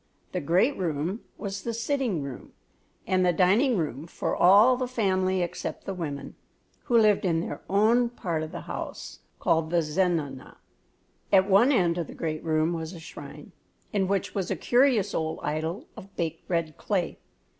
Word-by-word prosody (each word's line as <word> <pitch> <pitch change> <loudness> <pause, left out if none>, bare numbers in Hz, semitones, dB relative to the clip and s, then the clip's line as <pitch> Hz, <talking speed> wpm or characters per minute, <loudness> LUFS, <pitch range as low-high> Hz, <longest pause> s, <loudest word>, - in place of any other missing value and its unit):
The - - -2
great 185 - +2
room 170 +4 -2 0.2
was 195 -2 -5
the 230 +2 -3
sitting 230 - -1
room 135 -3 -8 0.5
and 185 -1 +2
dining 215 +7 +4
room 150 -2 -3
for - - -2
all 205 +8 +6
the 255 0 -2
family 190 -6 +1
except 175 - -5
the 195 - -3
women, 150 -6 -5 0.5
who 240 -3 +3
lived 215 -2 +4
in 170 -4 +1
their 165 - -5
own 225 +5 +3
part 175 -9 -3
of 155 - -5
the - - -6
house, - - -7 0.2
called 160 -1 +1
the 170 0 +2
zenana. 155 -5 -1 0.7
At 190 -1 +5
one 205 +7 +5
end 175 -9 +2
of 170 - -3
the - - -10
great 155 -1 -3
room 160 +1 +1
was 160 +1 -5
a 170 - -9
shrine, 160 - -10 0.4
in 195 -2 +1
which 195 0 -1
was 195 -3 -2
a - - 0
curious 240 -6 +3
old 160 0 -2
idol 160 - -2
of 195 +1 -12
baked 165 -2 -4
red 165 -3 -1
clay. 185 -5 -2
185 Hz, 170 wpm, -27 LUFS, 160-210 Hz, 0.7 s, all